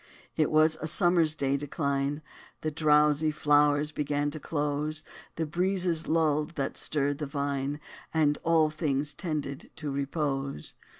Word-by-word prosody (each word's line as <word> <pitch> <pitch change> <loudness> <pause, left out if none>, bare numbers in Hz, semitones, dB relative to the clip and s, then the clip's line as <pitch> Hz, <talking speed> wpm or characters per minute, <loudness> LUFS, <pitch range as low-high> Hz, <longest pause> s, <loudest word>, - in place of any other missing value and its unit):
It 155 -2 +2
was 155 +1 +4
a 155 - -2
summer 175 +1 +4
day's 140 -3 0
decline: 140 0 -2 0.4
The 155 - -2
drowsy 150 0 +3
flowers 150 0 +3
began 145 0 -1
to 155 - -6
close; 150 +1 -2 0.3
The 160 - -1
breezes 175 0 0
lulled, 155 -1 +1
that 140 - -2
stirred 145 -1 0
the 150 - -3
vine; 140 0 -2 0.3
And 150 -2 +2
all 160 -2 +3
things 145 -2 -1
tended 145 -4 -4
to 150 -3 -4
repose. 140 - -2
150 Hz, 135 wpm, -28 LUFS, 145-155 Hz, 0.4 s, was